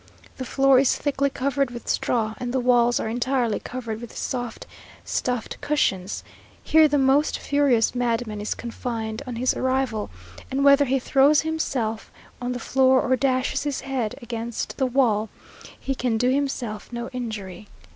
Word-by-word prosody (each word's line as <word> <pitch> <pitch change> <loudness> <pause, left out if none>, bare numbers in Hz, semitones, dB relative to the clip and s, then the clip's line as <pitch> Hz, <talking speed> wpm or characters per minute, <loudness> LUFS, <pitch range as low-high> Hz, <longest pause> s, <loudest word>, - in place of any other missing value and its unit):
The 260 - -4
floor 270 +1 +4
is 270 - +3
thickly 280 -1 0
covered 275 0 0
with 240 -1 -9
straw, 220 -3 0
and 245 -1 -3
the 260 - 0
walls 240 -1 +3
are - - -2
entirely 240 0 0
covered 230 -3 -6
with 235 - -9
soft 245 -3 -4 0.4
stuffed 250 -3 -2
cushions. 195 -10 0 0.4
Here 315 0 +5
the 295 0 +1
most 275 +2 +3
furious 280 -6 +2
madman 235 -3 -1
is 210 - -2
confined 230 -1 -4
on 245 - -4
his 250 +2 +1
arrival, 260 - -1 0.4
and 275 +1 0
whether 280 0 +6
he 270 +1 +1
throws 280 +3 +4
himself 265 -9 -2 0.3
on 245 0 -2
the - - -3
floor, 260 +1 +3
or 260 - +2
dashes 255 0 0
his 290 -2 -2
head 255 -4 -2
against 235 0 -4
the 265 - +1
wall, 230 -5 +2 0.5
he 270 - -2
can 250 -3 -1
do 245 +3 +2
himself 260 -7 -2
no 235 0 -4
injury. 215 -6 -6
250 Hz, 160 wpm, -24 LUFS, 230-270 Hz, 0.5 s, whether